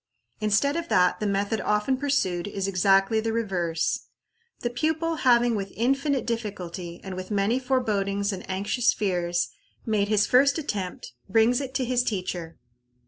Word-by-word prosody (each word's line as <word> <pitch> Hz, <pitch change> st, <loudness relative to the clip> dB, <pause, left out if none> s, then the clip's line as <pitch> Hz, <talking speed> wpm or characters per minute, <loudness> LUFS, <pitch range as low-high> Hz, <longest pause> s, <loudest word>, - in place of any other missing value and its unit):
Instead 215 Hz, +7 st, +2 dB
of 335 Hz, 0 st, -3 dB
that, 180 Hz, -1 st, +3 dB
the 210 Hz, -, -1 dB
method 200 Hz, +1 st, 0 dB
often 210 Hz, +5 st, +1 dB
pursued 255 Hz, -11 st, 0 dB
is 195 Hz, -1 st, -3 dB
exactly 195 Hz, +3 st, +3 dB
the 225 Hz, +1 st, -1 dB
reverse. 180 Hz, -7 st, -1 dB, 0.5 s
The 240 Hz, -, -1 dB
pupil 320 Hz, +5 st, -1 dB
having 240 Hz, -3 st, +4 dB
with 195 Hz, -2 st, -3 dB
infinite 270 Hz, +2 st, +1 dB
difficulty, 185 Hz, -7 st, -5 dB
and 190 Hz, -1 st, -6 dB
with 185 Hz, 0 st, -6 dB
many 205 Hz, +4 st, +1 dB
forebodings 205 Hz, -6 st, 0 dB
and 185 Hz, -, -6 dB
anxious 205 Hz, +6 st, +1 dB
fears, 175 Hz, -3 st, -1 dB, 0.4 s
made 210 Hz, -3 st, +1 dB
his 210 Hz, 0 st, +3 dB
first 275 Hz, +4 st, +4 dB
attempt, 200 Hz, -, -4 dB, 0.2 s
brings 225 Hz, +5 st, +3 dB
it 265 Hz, -1 st, -6 dB
to 260 Hz, -, +1 dB
his 245 Hz, 0 st, +1 dB
teacher. 180 Hz, -6 st, -4 dB
210 Hz, 150 wpm, -26 LUFS, 190-250 Hz, 0.5 s, having